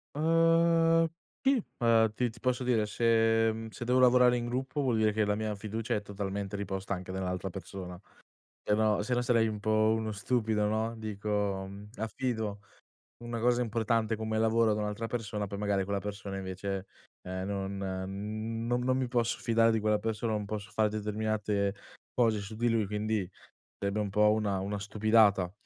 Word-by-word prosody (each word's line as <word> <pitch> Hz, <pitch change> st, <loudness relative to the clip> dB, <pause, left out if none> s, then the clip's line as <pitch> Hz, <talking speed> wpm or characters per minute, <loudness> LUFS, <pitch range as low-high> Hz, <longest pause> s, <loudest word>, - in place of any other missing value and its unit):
Ehm, 165 Hz, +1 st, +4 dB, 0.4 s
ti, 270 Hz, -3 st, +3 dB, 0.2 s
uhm 115 Hz, -2 st, +4 dB
ti 125 Hz, +1 st, +1 dB
ti 115 Hz, 0 st, -14 dB
posso 125 Hz, 0 st, 0 dB
dire 120 Hz, -4 st, +2 dB
se, 115 Hz, 0 st, +3 dB
mhmm 110 Hz, 0 st, -6 dB
se 120 Hz, -, -7 dB
devo 125 Hz, +1 st, +3 dB
lavorare 125 Hz, -1 st, +6 dB
in 120 Hz, -, -3 dB
gruppo, 130 Hz, +4 st, -2 dB
vuol 125 Hz, -5 st, +1 dB
dire 110 Hz, -1 st, +3 dB
che 110 Hz, 0 st, +1 dB
la 105 Hz, 0 st, +1 dB
mia 110 Hz, 0 st, -2 dB
fiducia 110 Hz, +2 st, -3 dB
è 105 Hz, -, -1 dB
totalmente 100 Hz, -1 st, -4 dB
riposta 100 Hz, -1 st, -3 dB
anche 90 Hz, -1 st, -5 dB
nell'altra 95 Hz, 0 st, -3 dB
persona. 90 Hz, -1 st, -8 dB, 0.6 s
Se 105 Hz, -, +1 dB
no 110 Hz, -1 st, +2 dB
se 125 Hz, +4 st, -1 dB
no 120 Hz, -, +1 dB
sarei 115 Hz, -2 st, +3 dB
un 105 Hz, -1 st, -4 dB
po' 110 Hz, +1 st, +3 dB
uno 110 Hz, -1 st, -2 dB
stupido, 110 Hz, -1 st, 0 dB
no, 110 Hz, +2 st, -1 dB
dico 105 Hz, -2 st, -2 dB, 0.3 s
affido 110 Hz, -2 st, -3 dB, 0.6 s
una 120 Hz, 0 st, -4 dB
cosa 120 Hz, +1 st, +2 dB
importante 115 Hz, -1 st, 0 dB
come 110 Hz, 0 st, -2 dB
lavoro 110 Hz, 0 st, +3 dB
da 105 Hz, -, -2 dB
un'altra 105 Hz, +2 st, -3 dB
persona, 105 Hz, -3 st, -3 dB
poi 100 Hz, 0 st, -6 dB
magari 100 Hz, -2 st, 0 dB
quella 100 Hz, +1 st, -2 dB
persona 100 Hz, -1 st, -5 dB
invece, 95 Hz, +1 st, -4 dB, 0.4 s
ehm, 95 Hz, +1 st, -4 dB
no 100 Hz, -1 st, -2 dB
non, 100 Hz, -, -5 dB, 0.3 s
mhmm, 110 Hz, +3 st, -4 dB
non 120 Hz, +1 st, +1 dB
non 130 Hz, +1 st, +1 dB
mi 130 Hz, -, 0 dB
posso 120 Hz, -1 st, 0 dB
fidare 115 Hz, 0 st, +3 dB
di 110 Hz, -, +2 dB
quella 105 Hz, 0 st, +2 dB
persona, 110 Hz, +1 st, -2 dB
non 105 Hz, -1 st, -1 dB
posso 105 Hz, 0 st, -5 dB
fare 110 Hz, 0 st, +2 dB
determinate 105 Hz, -1 st, -1 dB, 0.4 s
cose 115 Hz, -4 st, +2 dB
su 100 Hz, +2 st, -8 dB
di 120 Hz, +2 st, +1 dB
lui, 115 Hz, -2 st, +2 dB
quindi 105 Hz, -1 st, -1 dB, 0.5 s
sarebbe 100 Hz, +1 st, -1 dB
un 105 Hz, -1 st, -1 dB
po' 105 Hz, +2 st, +4 dB
una 105 Hz, -3 st, 0 dB
una 100 Hz, +2 st, -3 dB
stupidata. 100 Hz, -2 st, +3 dB
110 Hz, 180 wpm, -30 LUFS, 100-115 Hz, 0.6 s, lavorare